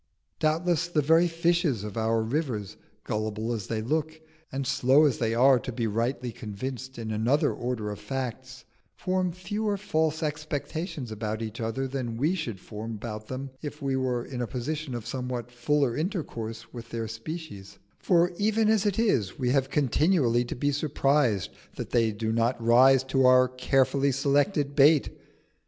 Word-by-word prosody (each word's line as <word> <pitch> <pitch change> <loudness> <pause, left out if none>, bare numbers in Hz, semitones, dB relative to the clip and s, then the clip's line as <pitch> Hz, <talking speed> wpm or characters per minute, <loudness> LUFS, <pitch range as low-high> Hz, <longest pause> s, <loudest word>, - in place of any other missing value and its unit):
Doubtless 165 +2 +1
the 155 -4 +1
very 165 +4 +5
fishes 170 - +1
of 105 -2 -6
our 115 0 +1
rivers, 115 - -2 0.3
gullible 110 +2 -2
as 105 -4 -4
they 110 -1 -2
look, 155 +5 -1 0.3
and 135 0 -3
slow 135 +2 +4
as 135 -6 +1
they 115 -1 0
are 130 +1 +6
to 125 - -5
be 115 -1 -2
rightly 120 +3 -1
convinced 130 +5 -6
in 110 -2 -4
another 115 +7 +2
order 120 -4 -3
of 105 - -7
facts, 130 +2 -5 0.3
form 185 -1 0
fewer 205 +4 -2
false 160 -4 0
expectations 150 - -4
about 110 +1 -3
each 110 +1 -6
other 115 +4 -2
than 125 -4 -4
we 150 +8 +2
should 125 - -4
form 110 +3 -7
about 110 0 -6
them 135 +1 -5
if 150 0 -6
we 135 -2 -1
were 125 -2 -1
in 125 -2 -5
a 120 - -2
position 135 +2 -4
of 115 -2 -6
somewhat 125 -1 -4
fuller 125 0 +1
intercourse 115 - -4
with 120 -1 -8
their 115 -1 -3
species; 115 - -7 0.2
for 175 -1 +3
even 215 +1 +2
as 215 -2 +3
it 200 - 0
is 165 - +1
we 125 -2 0
have 135 -1 +2
continually 140 -3 +2
to 120 - -5
be 145 +3 0
surprised 140 - +1 0.2
that - - -6
they 115 -2 +3
do 110 +1 -2
not 115 +2 +1
rise 125 +3 +5
to 135 0 +1
our 130 0 +6
carefully 135 +2 +1
selected 140 +2 +1
bait. 145 +1 +5
130 Hz, 170 wpm, -27 LUFS, 115-155 Hz, 0.3 s, are